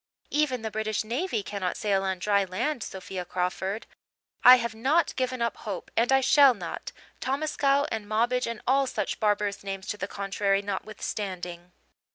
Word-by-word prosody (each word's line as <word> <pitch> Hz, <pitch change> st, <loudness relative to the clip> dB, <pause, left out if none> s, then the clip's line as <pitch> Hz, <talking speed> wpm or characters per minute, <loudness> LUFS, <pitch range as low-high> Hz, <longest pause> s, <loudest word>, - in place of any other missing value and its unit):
"Even 280 Hz, -6 st, +1 dB
the 220 Hz, -, -3 dB
British 215 Hz, 0 st, -1 dB
navy 235 Hz, -, -2 dB
cannot 190 Hz, -2 st, -3 dB
sail 200 Hz, -2 st, +1 dB
on 190 Hz, -1 st, -1 dB
dry 200 Hz, +2 st, +2 dB
land, 235 Hz, +9 st, -2 dB
Sophia 190 Hz, -2 st, -5 dB
Crawford. 185 Hz, +4 st, -2 dB, 0.6 s
I 250 Hz, -, +11 dB
have 235 Hz, -2 st, -2 dB
not 270 Hz, +10 st, +1 dB
given 255 Hz, -2 st, -1 dB
up 235 Hz, -, -1 dB
hope, 200 Hz, -4 st, -6 dB
and 235 Hz, +3 st, +2 dB
I 270 Hz, 0 st, +5 dB
shall 275 Hz, -1 st, +6 dB
not, 175 Hz, -5 st, -6 dB, 0.3 s
Tomascow 280 Hz, 0 st, +1 dB
and 220 Hz, -2 st, -3 dB
Mobbage 240 Hz, +3 st, +1 dB
and 230 Hz, -2 st, -5 dB
all 270 Hz, +1 st, +3 dB
such 210 Hz, -5 st, -2 dB
barbarous 205 Hz, -1 st, 0 dB
names 195 Hz, -1 st, -5 dB
to 210 Hz, -, -2 dB
the 195 Hz, -, -3 dB
contrary 200 Hz, 0 st, 0 dB
notwithstanding. 190 Hz, -3 st, -5 dB
215 Hz, 165 wpm, -27 LUFS, 195-255 Hz, 0.6 s, I